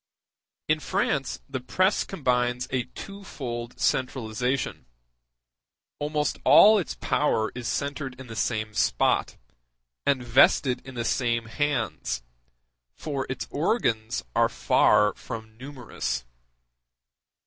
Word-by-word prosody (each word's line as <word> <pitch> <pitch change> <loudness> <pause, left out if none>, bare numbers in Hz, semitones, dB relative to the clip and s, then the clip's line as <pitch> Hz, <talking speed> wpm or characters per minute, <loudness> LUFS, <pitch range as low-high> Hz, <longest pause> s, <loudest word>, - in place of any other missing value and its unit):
In 155 0 +2
France 140 -2 -1
the 135 -2 -4
press 185 +10 +1
combines 125 -7 0
a 125 -2 0
twofold 125 -12 -7
centralization; 125 - -1 1.1
almost 150 0 -1
all 215 +1 +8
its 180 - -4
power 110 -7 +1
is 125 -1 -5
centred 140 -2 -3
in 130 - -8
the 115 -2 -9
same 110 -1 -1
spot, - - +1 0.7
and 140 -3 +1
vested 125 +1 +4
in 135 - -9
the 120 -1 -2
same 115 -2 0
hands, 115 - -2 0.7
for 140 -4 -4
its 130 - -3
organs 125 - 0
are - - +4
far 105 0 +4
from 110 -2 -8
numerous. 125 - -4
125 Hz, 105 wpm, -26 LUFS, 115-145 Hz, 1.1 s, all